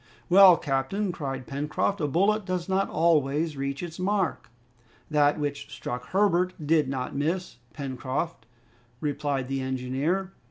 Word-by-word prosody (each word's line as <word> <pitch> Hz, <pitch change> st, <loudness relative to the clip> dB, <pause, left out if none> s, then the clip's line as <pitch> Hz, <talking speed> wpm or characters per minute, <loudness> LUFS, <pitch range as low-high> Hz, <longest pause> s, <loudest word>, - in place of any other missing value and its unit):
"Well, 185 Hz, -1 st, +8 dB
captain," 145 Hz, +9 st, -1 dB
cried 135 Hz, -6 st, -5 dB
Pencroft, 150 Hz, +8 st, -1 dB
"a 150 Hz, -, +1 dB
bullet 200 Hz, +8 st, +2 dB
does 185 Hz, -2 st, -3 dB
not 190 Hz, +1 st, +1 dB
always 155 Hz, -1 st, +2 dB
reach 140 Hz, +2 st, -3 dB
its 170 Hz, 0 st, -7 dB
mark." 190 Hz, -1 st, -1 dB, 0.6 s
"That 145 Hz, 0 st, +3 dB
which 145 Hz, -1 st, -4 dB
struck 125 Hz, +1 st, -5 dB
Herbert 185 Hz, -2 st, +2 dB
did 150 Hz, -2 st, +3 dB
not 130 Hz, -1 st, -3 dB
miss, 165 Hz, +3 st, -2 dB, 0.2 s
Pencroft," 130 Hz, -1 st, -4 dB, 0.5 s
replied 145 Hz, -3 st, -2 dB
the 135 Hz, 0 st, -2 dB
engineer. 135 Hz, +9 st, -1 dB
150 Hz, 130 wpm, -27 LUFS, 135-180 Hz, 0.6 s, Well